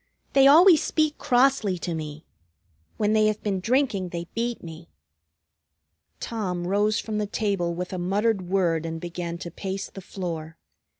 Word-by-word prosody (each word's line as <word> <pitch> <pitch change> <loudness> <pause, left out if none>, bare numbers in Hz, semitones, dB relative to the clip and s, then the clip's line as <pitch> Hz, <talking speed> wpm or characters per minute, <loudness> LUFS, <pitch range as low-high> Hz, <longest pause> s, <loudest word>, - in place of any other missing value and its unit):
"They 275 0 +6
always 325 +3 +7
speak 310 -1 0
crossly 245 -6 +2
to 170 0 -4
me. 155 -1 -6 0.7
When 210 0 +1
they 215 -1 +4
have 215 0 -2
been 200 -3 -1
drinking 225 -4 0
they 170 0 -5
beat 235 +1 -2
me." 165 0 -10 1.3
Tom 185 -6 -3
rose 205 +3 +1
from 215 -1 -3
the 210 - -1
table 200 -5 -1
with 180 +2 -5
a 185 - -3
muttered 195 +1 0
word 175 -4 +1
and 165 0 -4
began 170 0 -5
to 170 -1 -7
pace 195 +2 -5
the 195 - -9
floor. 165 -4 -6
195 Hz, 160 wpm, -25 LUFS, 170-220 Hz, 1.3 s, always